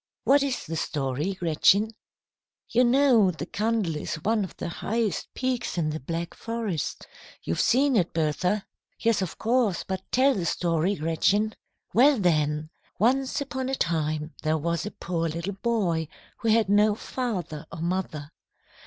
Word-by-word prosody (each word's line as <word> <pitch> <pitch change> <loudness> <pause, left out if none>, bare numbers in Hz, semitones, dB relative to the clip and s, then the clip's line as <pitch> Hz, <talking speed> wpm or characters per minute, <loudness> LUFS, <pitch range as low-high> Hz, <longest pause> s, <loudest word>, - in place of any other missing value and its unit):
What 280 +1 +5
is 275 -3 -1
the 165 - -4
story, 145 +4 -2
Gretchen?" 190 +5 +3 0.8
"You 245 +2 +4
know 245 -5 +5
the 165 -3 -4
Kandel 210 -7 -1
is 150 - -3
one 210 +6 0
of 190 - -8
the - - -4
highest 210 +2 -2
peaks 255 -6 -2
in 155 -3 0
the 155 - -4
Black 165 +4 -4
Forest. 225 -9 -3 0.4
You've 85 - -2
seen 270 +2 +3
it, 180 -5 +2
Bertha." 180 +6 0 0.3
"Yes, 230 -3 +1
of 185 - -4
course, 230 -5 +1
but 190 -1 -4
tell 270 +2 +4
the 180 -7 -2
story, 170 +3 +1
Gretchen." 195 +7 +1 0.4
"Well, 270 +4 +6
then, 155 -4 +1 0.3
once 265 +6 +2
upon 260 -1 -3
a 270 - 0
time 155 - -1
there 155 0 +1
was 170 +4 -1
a - - -2
poor 165 -2 -2
little 170 +5 -3
boy 185 -9 0 0.3
who 230 - -4
had 220 -1 +4
no 205 +1 +4
father 180 - -4
or 165 - -7
mother. 170 -4 -3
190 Hz, 155 wpm, -26 LUFS, 160-230 Hz, 0.8 s, Well